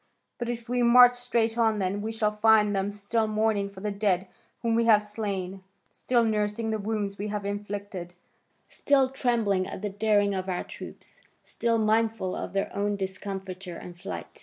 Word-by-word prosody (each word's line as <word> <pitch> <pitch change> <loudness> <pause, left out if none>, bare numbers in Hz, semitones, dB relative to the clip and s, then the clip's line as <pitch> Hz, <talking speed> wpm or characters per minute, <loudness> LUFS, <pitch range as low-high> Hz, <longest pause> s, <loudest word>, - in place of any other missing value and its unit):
But 240 -1 -3
if 235 -1 -4
we 245 +1 0
march 245 +1 +8
straight 235 -2 0
on 220 -2 +3
then, 195 +1 -1
we 220 +2 -3
shall 220 -1 0
find 210 -1 +4
them 195 +1 0
still 210 +2 -1
mourning 215 -2 +1
for 195 -1 -12
the 210 0 -2
dead 200 -2 0 0.4
whom 230 -1 +1
we 230 0 +2
have 215 -2 +5
slain, 195 -3 -4 0.3
still 240 -2 +1
nursing 215 0 0
the 220 - -1
wounds 205 -1 -3
we 205 - -2
have 205 -1 -3
inflicted, 200 -3 -5 0.5
still 270 -2 +2
trembling 230 -8 0
at 190 - -7
the 205 - -2
daring 205 0 +2
of 190 0 -3
our 180 - -1
troops, - - -11 0.2
still 230 -1 0
mindful 220 -3 +1
of - - -5
their 195 0 -2
own 205 +1 0
discomfiture 190 -2 -6
and 175 -1 -10
flight. 195 - -7
210 Hz, 180 wpm, -27 LUFS, 195-225 Hz, 0.5 s, march